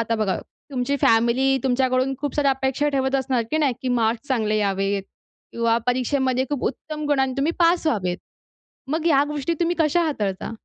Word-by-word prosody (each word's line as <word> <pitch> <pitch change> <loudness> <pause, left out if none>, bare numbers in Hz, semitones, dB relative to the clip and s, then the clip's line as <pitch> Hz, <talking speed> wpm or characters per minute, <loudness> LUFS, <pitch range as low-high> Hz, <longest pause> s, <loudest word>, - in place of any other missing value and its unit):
आता 230 0 0
बघा 215 -3 0 0.3
तुमची 260 +2 -1
फॅमिली 240 +4 +3
तुमच्याकडून 260 +1 +1
खूप 290 -1 -3
साऱ्या 285 -2 +2
अपेक्षा 265 +2 0
ठेवत 265 -1 0
असणार, 265 -2 +1
की 315 - +1
नाही, 285 -4 +2
की 260 - -2
मार्क्स 235 +1 0
चांगले 220 -5 +1
यावेत 195 0 0 0.5
किंवा 230 0 +1
परीक्षेमध्ये 255 +1 +1
खूप 285 -4 -2
उत्तम 305 +3 -5
गुणांनी 265 -2 +1
तुम्ही 290 +4 +1
पास 340 -1 +3
व्हावेत, 185 -9 0 0.7
मग 315 +2 -1
ह्या 285 -4 +5
गोष्टी 300 +2 -2
तुम्ही 345 +1 +1
कशा 320 +2 +3
हाताळता? 210 - -2
265 Hz, 170 wpm, -23 LUFS, 230-290 Hz, 0.7 s, ह्या